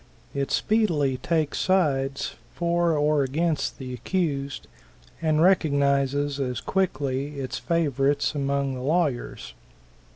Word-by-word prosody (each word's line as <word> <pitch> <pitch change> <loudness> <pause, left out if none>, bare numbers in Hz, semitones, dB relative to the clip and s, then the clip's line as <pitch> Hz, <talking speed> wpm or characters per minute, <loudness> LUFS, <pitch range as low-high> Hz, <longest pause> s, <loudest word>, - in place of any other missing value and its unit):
It 140 0 -2
speedily 160 - +1
takes 155 +3 -1
sides 140 -8 +1 0.2
for 170 -1 +1
or 150 0 +3
against 155 +4 -1
the 130 -2 -6
accused, 140 -2 -2 0.6
and 155 0 +2
recognizes 140 -5 +2
as 125 -3 -2
quickly 145 -6 -1
its 130 -2 -4
favorites 145 -4 +1
among 140 -1 -1
the 130 - -5
lawyers. 145 - -1
145 Hz, 105 wpm, -25 LUFS, 135-165 Hz, 0.6 s, or